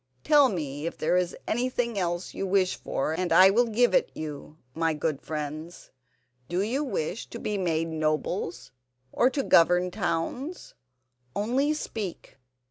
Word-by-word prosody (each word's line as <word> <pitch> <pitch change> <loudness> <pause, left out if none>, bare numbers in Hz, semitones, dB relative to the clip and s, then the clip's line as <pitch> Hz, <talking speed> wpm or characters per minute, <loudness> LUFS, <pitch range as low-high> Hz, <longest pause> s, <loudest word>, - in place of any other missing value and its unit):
Tell 290 -3 +6
me 150 - -4
if - - -5
there 160 - +1
is 180 -1 0
anything 240 -2 -1
else 175 0 -2
you 195 - -3
wish 185 -1 +2
for 155 - -2
and 180 +2 -2
I 190 +1 +8
will 240 +4 +3
give 240 +2 +2
it - - +3
you, 150 0 -7 0.2
my 165 -1 0
good 150 -1 -2
friends. 155 +2 -6 0.6
Do 180 +2 0
you 255 +8 -1
wish 195 - -3
to - - -8
be 210 -2 -3
made 165 -4 0
nobles, 160 +2 -2 0.4
or 250 - +3
to 270 +1 -2
govern 180 -1 +4
towns? 215 - -3 0.6
Only 260 +9 +1
speak." 210 - -6
180 Hz, 150 wpm, -27 LUFS, 160-235 Hz, 0.6 s, I